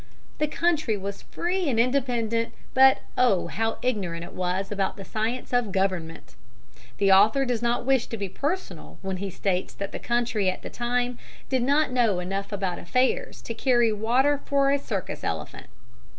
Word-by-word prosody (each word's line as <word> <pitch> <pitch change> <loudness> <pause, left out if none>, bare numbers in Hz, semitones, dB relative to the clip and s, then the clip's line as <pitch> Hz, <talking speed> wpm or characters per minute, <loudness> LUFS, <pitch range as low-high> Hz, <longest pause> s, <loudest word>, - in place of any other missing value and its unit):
The 305 - +2
country 305 -8 +1
was 200 0 -5
free 355 -1 -2
and 230 -4 +1
independent, 235 -3 +1 0.2
but, 265 0 +6
oh, 240 -8 +3
how 225 +2 -1
ignorant 190 -9 -1
it - - -9
was 185 +2 -2
about 195 -1 -1
the 195 - -8
science 230 +4 -3
of 245 -4 +1
government! 185 -4 -2 0.6
The 195 -1 +3
author 215 +8 +5
does 245 -3 -1
not 240 0 0
wish 265 -2 +2
to 230 - -5
be 200 -1 -3
personal 300 - -4
when 190 -1 -2
he 195 +1 -4
states 185 0 -2
that 200 - -5
the - - -5
country 235 -5 +1
at 185 - -4
that - - -8
time 245 0 -1 0.3
did 260 -2 +1
not 285 +3 +2
know 235 -6 +2
enough 195 +3 -3
about 195 -3 -2
affairs 255 - 0
to 230 - -4
carry 240 -2 +3
water 255 +7 +2
for 275 -1 +2
a 280 - +2
circus 205 -9 -4
elephant. - - -4
230 Hz, 175 wpm, -26 LUFS, 195-255 Hz, 0.6 s, but